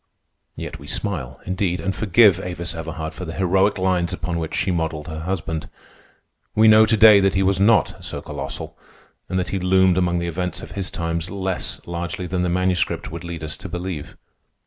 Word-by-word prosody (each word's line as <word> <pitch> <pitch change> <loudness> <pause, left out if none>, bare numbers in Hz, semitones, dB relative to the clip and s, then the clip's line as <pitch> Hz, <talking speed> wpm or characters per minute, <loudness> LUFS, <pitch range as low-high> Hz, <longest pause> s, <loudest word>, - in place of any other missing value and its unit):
Yet - - -7
we 70 - -12
smile, 65 - -4
indeed, 95 -1 -1
and 95 0 -2
forgive 100 -2 +5
Avis 90 -2 -4
Everhard 80 -1 -5
for 90 - -7
the 85 0 -6
heroic 95 +2 +2
lines 90 -2 +1
upon 90 -2 -3
which 80 0 -4
she 95 +2 0
modelled 80 -3 -2
her 80 -1 -5
husband. 80 -2 -3 0.9
We 110 +1 +6
know 110 0 +7
to 110 0 +3
day 105 -1 +9
that 95 -1 +2
he 95 - +3
was 95 -1 +2
not 105 -2 +3
so - - -4
colossal, - - -6 0.5
and 95 - -1
that 90 - -1
he 95 - -1
loomed 95 0 +4
among 90 -1 +1
the 85 - -1
events 90 +2 -3
of - - -9
his 95 -2 -3
times 85 +1 -3
less 95 -2 -3
largely 85 +1 -4
than 90 +1 -2
the 90 - +1
Manuscript 90 -1 0
would 85 +1 -7
lead 85 -2 -6
us 80 0 -4
to 95 - -8
believe. 90 -3 -5
90 Hz, 195 wpm, -22 LUFS, 85-95 Hz, 0.9 s, day